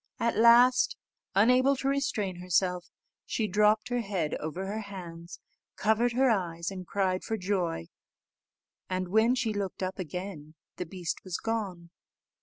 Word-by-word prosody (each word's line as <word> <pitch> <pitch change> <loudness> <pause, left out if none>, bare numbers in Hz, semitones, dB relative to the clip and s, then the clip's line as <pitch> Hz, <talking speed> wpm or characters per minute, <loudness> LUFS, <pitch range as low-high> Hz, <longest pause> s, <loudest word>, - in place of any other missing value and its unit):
At 235 - +1
last, 245 - +6 0.4
unable 250 +7 +5
to 270 +1 -3
restrain 225 -9 -1
herself, 180 0 0 0.3
she 220 -3 -1
dropped 210 +3 +3
her 245 0 0
head 190 -8 -2
over 165 +5 -4
her 205 +3 -3
hands, 175 -4 -9 0.4
covered 220 +3 +2
her 265 +2 +3
eyes, 175 -6 0
and 185 -2 -7
cried 190 -2 0
for 220 - -2
joy; 180 - -1 1.0
and, 185 -1 -2
when 220 +5 +4
she 235 -4 -1
looked 200 -2 -3
up 185 +1 -3
again, 175 -3 -6 0.2
the 180 - -4
beast 180 -1 -4
was 185 -2 -3
gone. 195 -7 -4
195 Hz, 145 wpm, -29 LUFS, 180-225 Hz, 1.0 s, last